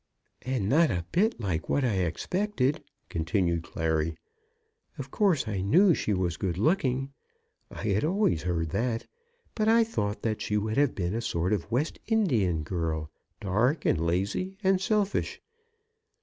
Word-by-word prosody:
"And 130 -6 -2
not 155 +7 +4
a 85 -1 -2
bit 215 - +2
like 95 -7 -2
what 140 - +2
I 115 - +1
expected," 140 - -1 0.2
continued 85 +1 0
Clary. 80 -1 -1 0.8
"Of - - -7
course 185 - +2
I 100 -3 -2
knew 175 - +5
she 110 - -1
was 90 -4 0
good 90 -3 -2
looking. 135 - +1 0.6
I - - -8
had 105 -1 +1
always 175 - +1
heard 85 -2 -2
that. 115 +4 -1 0.5
But 215 -1 0
I 230 +1 +6
thought 105 - -3
that 110 -2 -1
she 105 - 0
would 110 +3 -2
have 145 -2 +3
been 90 -1 -2
a 115 - -1
sort 90 -3 -1
of 100 -6 -2
West 135 +7 -1
Indian 120 - +1
girl, 80 -2 -3 0.3
dark, 115 - +1
and 80 - +2
lazy, 100 - -1
and 190 -1 +3
selfish. 205 0 0
110 Hz, 155 wpm, -28 LUFS, -, 0.8 s, I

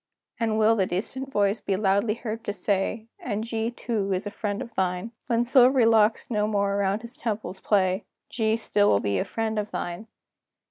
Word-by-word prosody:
Then 225 -2 +1
will 220 +1 +4
the 190 -4 +1
distant 260 +9 -4
voice 205 -1 +2
be 195 - 0
loudly 200 +2 +2
heard 225 -1 -5
to 205 - -2
say: 200 +3 -1
"And 205 +2 -3
G, 225 0 -2
too, 225 -4 -2
is 185 +2 -2
a 205 - -4
friend 205 -1 -3
of 235 -3 -7
thine! 185 +3 -1 0.2
When 235 0 +2
silvery 255 0 +5
locks 225 +1 +3
no 210 -2 +1
more 200 -2 +1
around 200 +2 0
his 235 +1 -10
temples 215 -4 -4
play, 190 -1 +1 0.2
G 220 -2 0
still 205 -2 +2
will 100 - +4
be 100 -2 0
a - - +1
friend 220 -1 -2
of 210 0 -3
thine!" 175 +6 -5
215 Hz, 195 wpm, -26 LUFS, 200-225 Hz, 0.2 s, silvery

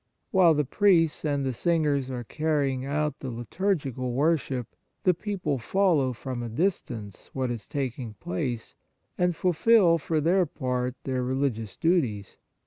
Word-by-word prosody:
While 180 -5 +5
the 150 -1 +1
priests 170 0 +3
and 145 -3 0
the 130 - -1
singers 145 -2 +1
are 125 -2 -4
carrying 140 -2 -1
out 150 +2 -1
the 130 - -5
liturgical 130 - -2
wor 155 +6 +3
ship, 130 -5 -4 0.4
the 180 - +5
people 180 -7 -2
follow 160 -1 +2
from 125 +1 -5
a 120 - -4
dis 170 - +1
tance 105 -5 -9
what 130 -2 -1
is 115 -3 -6
taking 125 -5 -4
place, 115 +6 -4 0.4
and 180 -1 +1
fulfil 180 0 +4
for 160 +1 0
their 175 +4 +3
part 125 -3 -2
their 130 -1 -1
religious 125 -5 -2
duties. 125 - 0
140 Hz, 150 wpm, -27 LUFS, 125-165 Hz, 0.4 s, While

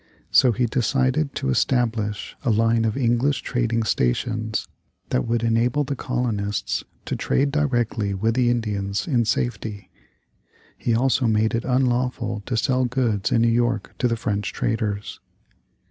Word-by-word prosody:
So 125 - +6
he 120 +2 +1
decided 130 +4 0
to 65 - -1
establish 110 - 0
a 135 - -1
line 115 +1 +3
of 110 +2 -1
English 125 +2 +1
trading 115 -2 0
stations 110 - -1 0.4
that 65 - 0
would 115 0 0
enable 115 +5 +2
the 140 0 -3
colonists 115 -6 -2 0.2
to - - -2
trade 140 +1 +1
directly 120 -8 0
with 110 +4 +1
the 125 0 +2
Indians 105 -4 -1
in 120 -7 +2
safety. 110 -1 -2 0.8
He 115 - 0
also 125 0 +2
made 110 0 +2
it 115 +1 -1
unlawful 125 -4 0
to 125 - -1
sell 130 +2 +2
goods 120 -5 0
in 115 - +3
New - - +4
York 115 -3 0
to 125 - +2
the 115 -1 0
French 100 -2 -2
traders. 105 -3 -2
115 Hz, 145 wpm, -23 LUFS, 110-125 Hz, 0.8 s, So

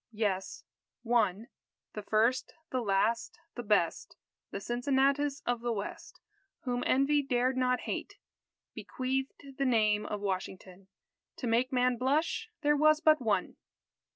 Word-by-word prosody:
Yes 200 -3 -2 0.4
one 225 -3 +1 0.5
the 210 - -5
first 225 +5 +1 0.2
the 255 - 0
last 215 +2 0 0.2
the 240 - -5
best 205 -7 0 0.3
The - - -5
Cincinnatus 275 +5 0
of 240 -1 -1
the 240 0 -1
West, 205 -2 -6 0.4
Whom 245 -1 -2
Envy 280 +2 +3
dared 255 -1 0
not 250 -1 +1
hate, - - -5 0.6
Bequeathed 265 +1 -4
the 275 - +2
name 215 -4 +2
of 210 - -3
Washington, 190 -1 -5 0.5
To - - -6
make 240 +3 +1
man 250 -1 +2
blush 310 - 0
there 295 0 +4
was 310 +1 +4
but 310 -3 +4
one! 220 -4 0
245 Hz, 130 wpm, -31 LUFS, 215-270 Hz, 0.6 s, there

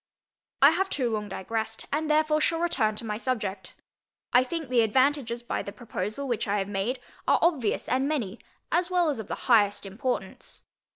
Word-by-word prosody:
I - - +9
have 385 0 0
too 250 -8 -1
long 210 -1 -2
digressed, 220 +3 -4
and 310 +1 0
therefore 305 0 +3
shall 330 +2 +2
return 255 -11 +1
to 230 - -7
my 210 -1 -2
subject. 210 -6 -3 0.6
I 250 - +6
think 320 +3 -4
the 245 -2 +3
advantages 245 +1 +2
by - - -2
the 200 - -6
proposal 215 +4 -4
which 240 -4 -1
I 205 +1 +1
have 195 -1 -1
made 205 +6 -2 0.3
are - - +5
obvious 290 -11 +1
and 260 +2 +1
many, 240 -9 -2 0.3
as 355 +1 +2
well 355 -4 +2
as 270 - -4
of 215 - -6
the - - -3
highest 210 -5 +4
importance. 245 +6 -4
240 Hz, 185 wpm, -27 LUFS, 210-290 Hz, 0.6 s, I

